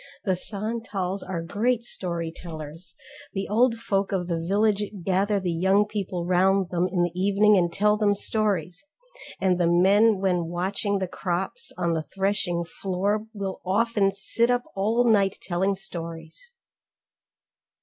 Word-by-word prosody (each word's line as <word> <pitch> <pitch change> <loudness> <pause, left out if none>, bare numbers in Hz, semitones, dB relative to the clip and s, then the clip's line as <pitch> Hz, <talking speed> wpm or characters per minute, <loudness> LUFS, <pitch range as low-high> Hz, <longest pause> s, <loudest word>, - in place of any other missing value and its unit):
The 190 -2 +2
Santals 200 -1 -3
are 175 -3 -4
great 230 +7 0
story 170 -7 -4
tellers; 160 0 -8 0.4
the 195 -1 -3
old 230 +3 +3
folk 200 -4 -1
of 180 -3 -1
the 170 -2 -1
village 205 +3 +2 0.2
gather 195 +2 +2
the 185 -2 -2
young 190 +5 +3
people 190 -4 -3
round 185 +1 +3
them 180 0 +1
in 180 -2 +2
the 175 - 0
evening 200 +3 +4
and 175 -3 +2
tell 210 +3 +2
them 205 -1 +2
stories, 195 - -1 0.6
and 185 -2 +2
the 175 - +3
men 200 +5 +5
when 180 -3 +1
watching 195 +4 -1
the 190 -1 -2
crops 185 - -3
on 170 -1 0
the 160 - 0
threshing 190 -1 -1 0.2
floor 200 +3 0
will 195 -2 -4
often 205 +1 +2
sit 230 +4 0
up 245 0 +2
all 220 +5 +2
night 200 -4 +3
telling 190 +2 0
stories. 170 - -8
195 Hz, 150 wpm, -25 LUFS, 175-210 Hz, 0.6 s, men